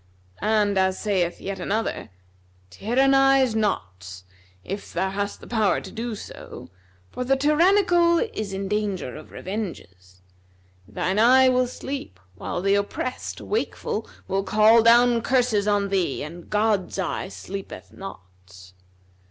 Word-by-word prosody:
And 210 Hz, -2 st, +2 dB
as 190 Hz, 0 st, +1 dB
saith 185 Hz, -5 st, -1 dB
yet 195 Hz, -1 st, -5 dB
another,[FN#260] 210 Hz, -, -2 dB, 0.6 s
'Tyrannize 270 Hz, +2 st, +3 dB
not, 95 Hz, -, -3 dB, 0.4 s
if 200 Hz, +2 st, -6 dB
thou 190 Hz, +2 st, -1 dB
hast 200 Hz, +1 st, -3 dB
the -, -, -11 dB
power 220 Hz, -4 st, +1 dB
to -, -, -10 dB
do 230 Hz, 0 st, -4 dB
so; 195 Hz, -, -10 dB, 0.4 s
for 250 Hz, -, -4 dB
the 270 Hz, +2 st, +2 dB
tyrannical 340 Hz, +4 st, +4 dB
is 215 Hz, -, -3 dB
in 195 Hz, 0 st, -4 dB
danger 200 Hz, -, -2 dB
of -, -, -11 dB
revenges. 95 Hz, -, -7 dB, 0.6 s
Thine 190 Hz, +3 st, -1 dB
eye 260 Hz, +3 st, +6 dB
will 255 Hz, 0 st, +2 dB
sleep 260 Hz, -, -7 dB
while 140 Hz, -, -5 dB
the 195 Hz, 0 st, +3 dB
oppressed, 200 Hz, +5 st, -3 dB
wakeful, 435 Hz, -, -3 dB, 0.2 s
will 195 Hz, 0 st, 0 dB
call 215 Hz, +3 st, +5 dB
down 235 Hz, +1 st, +5 dB
curses 240 Hz, -5 st, +1 dB
on 205 Hz, -1 st, +1 dB
thee, 185 Hz, -9 st, -1 dB
and 170 Hz, +3 st, -9 dB
God's 210 Hz, -3 st, 0 dB
eye 190 Hz, -1 st, -2 dB
sleepeth 195 Hz, 0 st, -8 dB
not.' 90 Hz, -, -12 dB
205 Hz, 130 wpm, -24 LUFS, 190-245 Hz, 0.6 s, eye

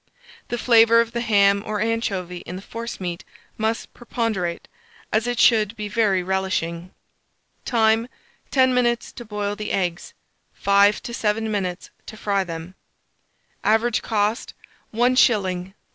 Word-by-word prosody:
The 240 Hz, -, -3 dB
flavour 230 Hz, -1 st, +5 dB
of 230 Hz, 0 st, +1 dB
the 235 Hz, -, -2 dB
ham 200 Hz, -3 st, +3 dB
or 215 Hz, -1 st, -3 dB
anchovy 205 Hz, -5 st, -2 dB
in 175 Hz, -, -8 dB
the 190 Hz, -, -8 dB
forcemeat 200 Hz, -7 st, -6 dB, 0.3 s
must 220 Hz, +1 st, -2 dB
preponderate, 220 Hz, -8 st, -3 dB, 0.5 s
as 220 Hz, +2 st, +1 dB
it 245 Hz, 0 st, -2 dB
should 220 Hz, -2 st, +4 dB
be 210 Hz, -1 st, -5 dB
very 205 Hz, -4 st, +1 dB
relishing. 185 Hz, -2 st, -2 dB, 0.8 s
Time. 225 Hz, -1 st, +2 dB, 0.4 s
10 260 Hz, -1 st, +3 dB
minutes 240 Hz, -1 st, +1 dB
to 240 Hz, -, -9 dB
boil 205 Hz, -2 st, -3 dB
the 210 Hz, 0 st, -5 dB
eggs, 175 Hz, -2 st, -2 dB, 0.4 s
5 200 Hz, +1 st, +3 dB
to 235 Hz, -, -6 dB
7 220 Hz, -1 st, -1 dB
minutes 185 Hz, -3 st, -3 dB, 0.2 s
to 215 Hz, -, -9 dB
fry 200 Hz, -2 st, 0 dB
them. 165 Hz, 0 st, -7 dB, 0.9 s
Average 225 Hz, +2 st, +2 dB
cost, 215 Hz, +1 st, -1 dB, 0.4 s
1s. 240 Hz, +3 st, +2 dB
4d. 190 Hz, -7 st, +2 dB
215 Hz, 135 wpm, -22 LUFS, 190-230 Hz, 0.9 s, flavour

